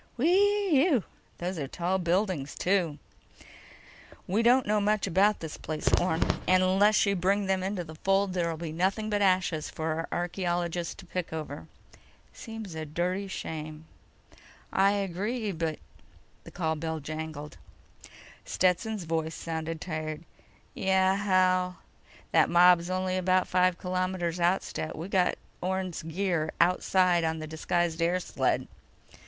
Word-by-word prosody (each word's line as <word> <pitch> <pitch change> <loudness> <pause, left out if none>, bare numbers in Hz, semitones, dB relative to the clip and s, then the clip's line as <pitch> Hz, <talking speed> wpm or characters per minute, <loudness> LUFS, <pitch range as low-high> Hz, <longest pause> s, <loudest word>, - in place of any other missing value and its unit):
"Whee 375 - +3
ew! 265 - +2 0.3
Those 180 0 -3
are 140 - -3
tall 180 +6 -1
buildings, 175 -4 0
too." 180 -5 +1 1.3
"We 200 +5 +1
don't 245 +2 +4
know 210 0 +2
much 210 0 +1
about 200 +4 +3
this 160 -2 -6
place, 155 -1 -5
Orne. 170 -2 +1 0.2
And 185 0 +5
unless 200 +4 +4
you 200 0 +1
bring 195 +3 +1
them 190 -1 +1
into 190 -1 -2
the 160 -1 -10
fold, 195 +3 +1
there'll 170 -3 -1
be 165 -1 -5
nothing 195 +6 0
but 205 0 +1
ashes 185 -5 +1
for 160 0 -3
our 165 +1 -3
archaeologists 175 -1 -2
to - - -12
pick 180 -1 -4
over." 155 -1 -6 0.7
"Seems 225 -5 -8
a 160 0 -4
dirty 180 +6 -2
shame." 155 -4 -6 0.9
"I 195 +1 +4
agree, 205 +3 -2
but—" 160 -3 -2 0.7
The - - -9
call 160 -3 -1
bell 160 +1 -3
jangled. 155 0 -6 0.9
Stetson's 185 +3 0
voice 160 -1 -2
sounded 165 0 -4
tired: 155 -2 -4 0.5
"Yeah, 190 0 +2
Hal?" 185 -2 +2 0.5
"That - - +4
mob's 175 0 +5
only 185 0 -1
about 185 0 +2
five 180 -1 +2
kilometers 185 -2 -2
out, 175 +3 +2
Stet. 155 - -5
We've 170 +5 -6
got 180 -2 +2 0.3
Orne's 185 -1 -2
gear 165 -1 -1
outside 180 0 +3
in 160 0 0
the 155 - -5
disguised 165 +1 -1
air 175 +2 +2
sled." - - -1
180 Hz, 140 wpm, -28 LUFS, 165-195 Hz, 1.3 s, And